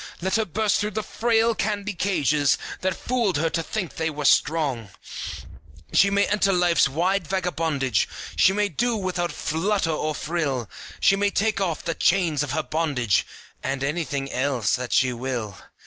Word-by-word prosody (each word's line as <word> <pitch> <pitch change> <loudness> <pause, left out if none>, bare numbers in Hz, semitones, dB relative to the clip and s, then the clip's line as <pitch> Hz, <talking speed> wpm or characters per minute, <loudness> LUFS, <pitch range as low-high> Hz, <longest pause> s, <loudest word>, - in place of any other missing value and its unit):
Let 190 +4 0
her 220 - +1
burst 210 +3 +1
through 210 +1 -3
the 215 - 0
frail 230 +1 +2
candy 210 -1 -2
cages 150 -7 +2 0.2
That 185 -1 -1
fooled 235 -9 0
her 160 +2 0
to 165 - 0
think 185 +1 -4
they 160 0 0
were 150 -1 -5
strong! 140 -9 +2 1.0
She 200 - +5
may 200 0 +3
enter 200 -1 +2
life's 175 -6 +3
wide 175 +5 0
vagabondage, 160 - 0 0.3
She 190 - +5
may 205 +1 +1
do 235 - 0
without 180 -3 -2
flutter 170 +2 0
or 155 0 -2
frill, 145 -9 -2 0.3
She 195 - +4
may 205 +1 +1
take 215 0 0
off 175 -5 -1
the 165 - 0
chains 170 -7 +2
of 145 -2 -2
her 155 - 0
bondage, 145 - 0 0.3
And 135 0 -2
anything 140 -2 -2
else 130 -6 +1
that 125 -1 -5
she 130 -1 +3
will. 120 -5 -4
165 Hz, 165 wpm, -24 LUFS, 140-200 Hz, 1.0 s, She